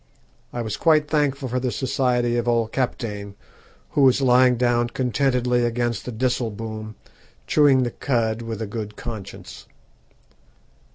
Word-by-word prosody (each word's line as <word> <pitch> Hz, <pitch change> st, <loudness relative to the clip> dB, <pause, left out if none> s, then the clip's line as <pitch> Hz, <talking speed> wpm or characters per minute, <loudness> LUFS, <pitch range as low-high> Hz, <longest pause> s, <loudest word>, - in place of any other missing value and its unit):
I 120 Hz, -, -3 dB
was 110 Hz, -2 st, -4 dB
quite 155 Hz, -2 st, +3 dB
thankful 145 Hz, -3 st, 0 dB
for 125 Hz, +1 st, -1 dB
the 125 Hz, 0 st, -1 dB
society 125 Hz, -2 st, 0 dB
of 120 Hz, 0 st, -1 dB
old 115 Hz, -2 st, +1 dB
Kaptein, 105 Hz, -6 st, -3 dB, 0.6 s
who 145 Hz, -, +1 dB
was 130 Hz, -1 st, +5 dB
lying 125 Hz, -1 st, +4 dB
down 120 Hz, 0 st, +2 dB
contentedly 125 Hz, -1 st, +1 dB
against 120 Hz, -1 st, -1 dB
the 125 Hz, -, -4 dB
disselboom, 110 Hz, -3 st, -3 dB, 0.5 s
chewing 140 Hz, -4 st, +4 dB
the 120 Hz, -, -2 dB
cud 115 Hz, -4 st, -1 dB
with 115 Hz, -1 st, -4 dB
a -, -, -2 dB
good 105 Hz, 0 st, -6 dB
conscience. 110 Hz, -5 st, -8 dB
120 Hz, 135 wpm, -23 LUFS, 115-130 Hz, 0.6 s, was